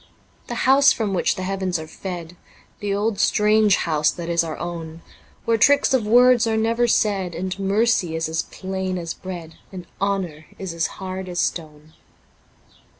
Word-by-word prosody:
6 - - -28 0.4
The - - -4
house 275 +2 +5
from 210 -4 -1
which 180 - +1
the 185 - -5
heavens 190 -1 -1
are 160 - -6
fed, 175 0 -7 0.4
The 205 -1 -3
old 205 +1 -1
strange 210 -1 +4
house 155 -2 +1
that 170 -1 -5
is 170 0 +2
our 160 -2 -5
own, 165 -1 -6 0.4
Where 230 -1 +2
tricks 280 +4 +4
of 235 -5 +1
words 245 +1 +5
are 220 -1 +1
never 230 +2 +1
said, 195 -6 +1
And 185 +1 -4
Mercy 195 -3 +1
is 160 0 -1
as 160 0 -1
plain 190 -1 -4
as 170 -1 -4
breac), 175 -4 -8 0.2
And 180 -2 -8 0.2
Honour 185 -6 -2
is 190 -3 -5
as 165 -1 0
hard 190 0 -6
as 175 -1 -3
stone. 155 -2 -4
190 Hz, 175 wpm, -22 LUFS, 170-210 Hz, 0.4 s, house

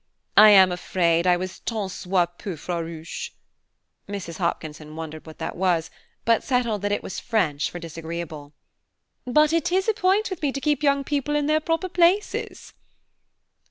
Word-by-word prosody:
I 215 - +9
am 190 -3 +7
afraid 175 -1 +1
I 180 -1 +5
was 185 +1 -6
tant 210 -5 -3
soit 180 -2 -1
peu 185 -5 -5
farouche," 165 0 -5 0.7
(Mrs. 190 -4 -6
Hopkinson 155 -3 -3
wondered 160 0 -7
what 160 - -11
that 160 - -5
was, 175 -3 0 0.3
but 230 -1 +3
settled 235 -6 0
that 205 0 -1
it 205 - -1
was - - -5
French 170 - 0
for - - -7
disagreeable,) 165 -3 -7 0.7
"but 300 +5 +4
it 335 +1 +1
is 380 +2 +1
a 440 - +3
point 405 +1 +1
with 370 - -5
me 290 -3 +1
to 275 - -3
keep 295 0 0
young 280 -1 +2
people 290 +1 -1
in 295 -1 +1
their 310 +1 +3
proper 330 +3 -1
places." 365 +3 0
190 Hz, 165 wpm, -24 LUFS, -, 0.7 s, I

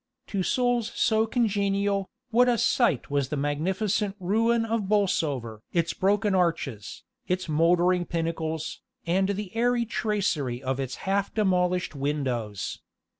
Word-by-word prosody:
To 195 - +1
souls 240 +4 +1
so 220 -1 +2
congenial, 200 -4 0 0.2
what 245 +2 +5
a 240 - +2
sight 220 - +2
was 140 -2 0
the 150 - -2
magnificent 190 +8 0
ruin 225 +5 +2
of 220 -3 -2
Bolsover! 145 - 0
its 170 -1 +1
broken 200 +1 +1
arches, 145 - -1 0.2
its 185 0 -1
mouldering 175 +3 +3
pinnacles, 165 -1 -3 0.2
and 190 +3 +1
the 200 0 -4
airy 240 +1 +2
tracery 190 - -1
of 130 +1 -1
its 130 -1 -3
half 195 +1 0
demolished 180 -4 +1
windows. 135 -8 -2
185 Hz, 125 wpm, -26 LUFS, 150-210 Hz, 0.2 s, what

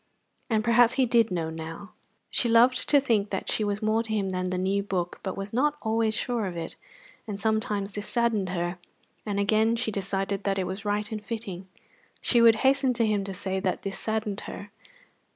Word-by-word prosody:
And 220 -2 +2
perhaps 235 +1 +4
he 265 - +3
did 230 -2 +3
know 165 -3 -2
now. 165 +5 -7 0.4
She 240 - +2
loved 240 +3 +4
to 290 - +6
think 220 -7 +1
that 195 - -3
she 215 - +1
was 205 +1 -2
more 215 +1 +2
to 225 -1 -6
him 200 -3 0
than 185 0 -2
the 185 - -2
new 190 +2 +1
book, 185 -3 -3
but 190 -1 -4
was 195 +1 -5
not 295 +5 +2
always 220 0 +1
sure 235 -5 -1
of 175 -2 -6
it; 165 -1 -5 0.5
and 205 -2 -5
sometimes 210 -2 -1
this 205 0 -5
saddened 230 -5 +1
her, 175 0 -2 0.5
and 200 -1 -1
again 220 +3 +3
she 230 -1 -1
decided 195 0 -2
that 195 -1 0
it 190 - 0
was 190 +3 -5
right 210 +1 -1
and 215 -1 -4
fitting. 200 -5 -5 0.5
She 240 - +3
would 230 -1 +7
hasten 265 -1 +4
to 230 -1 +1
him 210 -2 +1
to 195 - -5
say 190 0 -2
that 190 -2 -2
this 195 -1 -3
saddened 220 -2 -2
her. 200 0 -8
205 Hz, 205 wpm, -27 LUFS, 195-225 Hz, 0.5 s, would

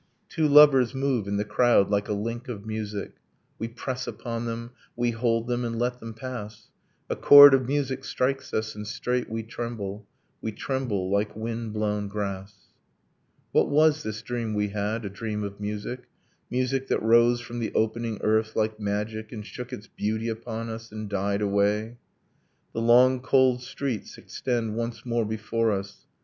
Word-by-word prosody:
Two 160 -1 +1
lovers 140 -4 +7
move 130 -6 0
in 100 0 -1
the 105 - -1
crowd 105 -2 +3
like 100 0 +1
a - - +1
link 115 +5 -4
of 110 -4 -6
music, 105 -2 -5 0.4
We 115 - -2
press 125 +2 -5
upon 115 -1 -4
them, 115 +1 -5 0.2
we 120 0 +1
hold 115 0 0
them, 120 0 -1
and 115 -1 -3
let 125 +1 -1
them 115 -2 -8
pass; 110 -3 -7 0.4
A - - -2
chord 145 -1 +10
of 130 -2 +3
music 140 -1 -1
strikes 135 +2 -1
us 110 0 -2
and 105 0 -7
straight 125 +3 -2
we 115 0 -3
tremble; 105 -3 -6 0.3
We 110 - -3
tremble 105 -8 -2
like 100 +1 0
wind 115 0 -4
blown 105 -1 -1
grass. 100 0 -4 1.0
What - - +3
was 155 +1 +4
this 110 -2 -5
dream 115 -3 -3
we 105 0 0
had, 105 +2 -2
a - - -3
dream 105 0 -4
of 100 0 -6
music, 105 +4 -5 0.4
Music 130 +1 -1
that - - 0
rose 120 +2 +5
from 120 0 -7
the 115 - -2
opening 110 0 0
earth 110 0 +1
like 110 0 0
magic 105 +1 -3
And 105 -3 -7
shook 125 +3 -8
its 115 -4 -7
beauty 110 +1 -2
upon 115 0 -5
us 115 0 -7
and 110 -1 -6
died 100 +1 0
away? 105 +3 0 0.7
The 115 - -2
long 125 +2 +5
cold 130 -1 +3
streets 125 -3 -4
extend 115 -4 -3
once 115 +1 -4
more 120 -2 0
before 110 +1 -1
us. 100 0 -5
115 Hz, 170 wpm, -26 LUFS, 105-120 Hz, 1.0 s, chord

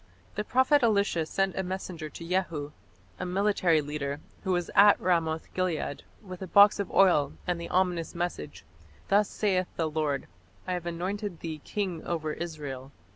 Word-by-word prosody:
The 210 - -2
prophet 260 +6 +3
Elisha 200 -8 +2
sent 195 +1 0
a - - 0
messenger 180 -4 -5
to 165 +2 -9
Jehu, 170 -5 -1 0.5
a 185 - -3
military 185 -4 +2
leader, 145 -1 -4 0.2
who 190 - -1
was 175 -1 -1
at 205 +1 +7
Ramoth 165 -3 0
gilead, 180 -6 -2 0.2
with 185 -2 -9
a 190 - -5
box 205 +3 +6
of 200 - -2
oil 160 -8 +4
and 175 -2 -1
the 170 - -6
ominous 180 -3 0
message, 85 - -4 0.4
"Thus 205 +1 +4
saith 185 -4 0
the 165 - 0
Lord, 150 -3 -1 0.4
I 185 - -2
have 175 -1 -4
anointed 185 +2 -4
thee 160 -3 -5
king 185 -6 -3
over 155 -3 -2
Israel. 145 -6 -6
175 Hz, 165 wpm, -28 LUFS, 155-190 Hz, 0.5 s, at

